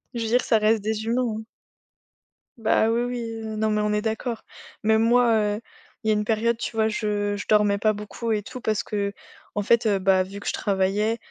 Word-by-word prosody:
Je 235 - -2
veux - - -2
dire 245 +2 +4
que - - -4
ça 225 - +4
reste 215 0 +3
des 220 0 -2
humains, 235 -1 0
hein. - - -7 1.1
Bah, 225 -1 +2
oui 235 +1 +1
oui, 235 -2 -4 0.2
non 215 0 +1
mais 210 0 +1
on 210 0 0
est 210 +1 0
d'accord. 225 +1 -3 0.4
Même 220 0 +4
moi, 235 0 +4 0.2
heu, 220 - -7 0.4
il - - -4
y - - +5
a - - +4
une 210 0 0
période, 225 +1 +1
tu 235 - -5
vois, 220 0 +2
je 210 -1 -1
je 205 - -5
dormais 210 -1 +4
pas 215 +1 +3
beaucoup 210 +3 -5
et 210 -2 0
tout 255 +2 -9
parce 215 -2 0
qu'en 205 0 -5
fait, 230 +2 +3
heu, 200 - +3
bah, 190 0 +3
vu 195 +2 -5
que - - -9
je - - 0
travaillais, 205 +3 0
220 Hz, 230 wpm, -24 LUFS, 210-230 Hz, 1.1 s, y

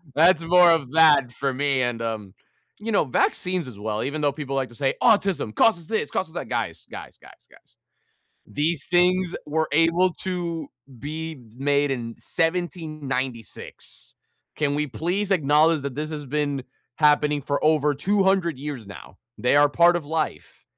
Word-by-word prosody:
That's 165 +2 +4
more 175 +1 +6
of 160 -6 +1
that 150 -5 +5
for 135 +3 -2
me, 135 0 0
and, 120 -2 -2
um, 110 -4 -5 0.5
you 225 +2 -4
know, 200 - +2
vaccines 180 +5 -1
as 110 -6 -11
well, 105 +1 -3
even 145 +4 -3
though 145 -1 +2
people 140 -1 -5
like 135 -1 -1
to 120 - -16
say, 135 +2 0
"Autism 195 - +2
causes 170 -8 +3
'this', 220 - -2
causes 160 -4 -3
'that'." - - -5
Guys, 110 -10 -3
guys, - - -10
guys, - - -19
guys. - - -23 0.7
These 150 +1 -2
things 180 0 +2
were 155 +1 -1
able 165 +4 +3
to 170 -4 -3 0.3
be 160 +4 -6 0.2
made 140 +1 +1
in 115 -3 -5
1796. 155 - -4 0.4
Can 145 -2 0
we 150 +1 -1
please 175 - -2
acknowledge 155 -2 +3
that 140 -2 -5
this 155 +2 -4
has 150 -2 -6
been 145 -1 -2 0.3
happening 150 -1 +3
for 140 +1 -2
over 150 -1 +3
200 190 0 +1
years 140 -6 -6
now, 95 -1 -12 0.2
they 125 - +2
are 145 0 +6
part 170 +4 +4
of 165 -4 -5
life. 155 - -4
150 Hz, 160 wpm, -24 LUFS, 135-170 Hz, 0.7 s, more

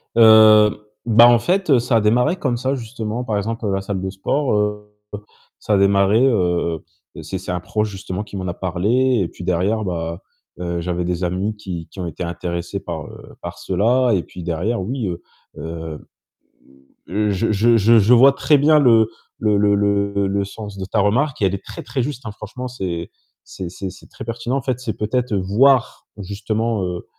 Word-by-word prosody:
Heu, 110 -2 +7 0.3
bah, 115 0 +7
en 120 -1 +5
fait 175 -3 +2
ça 120 0 0
a - - +2
démarré 125 - +2
comme 130 -9 -1
ça 130 +3 -1
justement, 115 -1 -5
par 110 -4 -2
exemple 110 +2 -3
la 95 0 -1
salle 95 -1 -4
de 95 - -3
sport, 130 +8 -1
heu, 105 0 -2 0.7
ça 105 - -1
a - - +4
démarré, 100 +3 +3
heu, 90 -8 +1 0.4
c'est 95 - -5
c'est 90 - -6
un 90 - -2
proche 105 +4 -2
justement 95 0 -5
qui 100 - -9
m'en 95 -1 -4
a 85 - -2
parlé 110 +9 +1
et - - -2
puis 90 - -11
derrière, 95 +5 0
bah, 85 -2 -4 0.4
heu, 85 -1 -3
j'avais 90 +1 -2
des 90 +1 -2
amis 95 +5 -1
qui 90 -5 -6
qui - - -13
ont 90 - -3
été 85 +2 -6
intéressés 85 0 -4
par, - - -6
heu, - - -13
par - - -7
cela 120 +7 +1
et 95 - +2
puis 90 - -10
derrière 90 +7 -2
oui, 115 +3 -3
heu 90 -1 -5 0.4
heu, 80 0 -6 1.3
je 100 +2 0
je 115 +3 +3
je 115 +2 +5
je 110 +4 +4
vois 135 +3 +7
très 150 +1 +3
bien 150 +2 +5
le 115 -5 +5 0.3
le 105 -2 +2
le 100 0 +3
le 100 0 +1
le 100 +1 0
sens 105 0 -9
de 95 - -5
ta 100 +3 -1
remarque 120 +8 +1
et - - +4
elle 95 0 +1
est 100 - -9
très, - - -8
très 130 - -3
juste, 130 -1 -5
hein. 110 - -5
Franchement, 110 +5 -7
c'est 90 -9 -5 0.3
c'est 90 -2 -7
c'est 95 +2 -6
c'est 95 - -16
très - - -10
pertinent 120 +3 -3
en - - -2
fait. 130 -2 -2
C'est 115 -4 -4
peut-être 120 +1 -1
voir 115 +7 +2
justement, 105 +2 -2
heu 90 -1 -4
105 Hz, 200 wpm, -20 LUFS, 95-120 Hz, 1.3 s, Heu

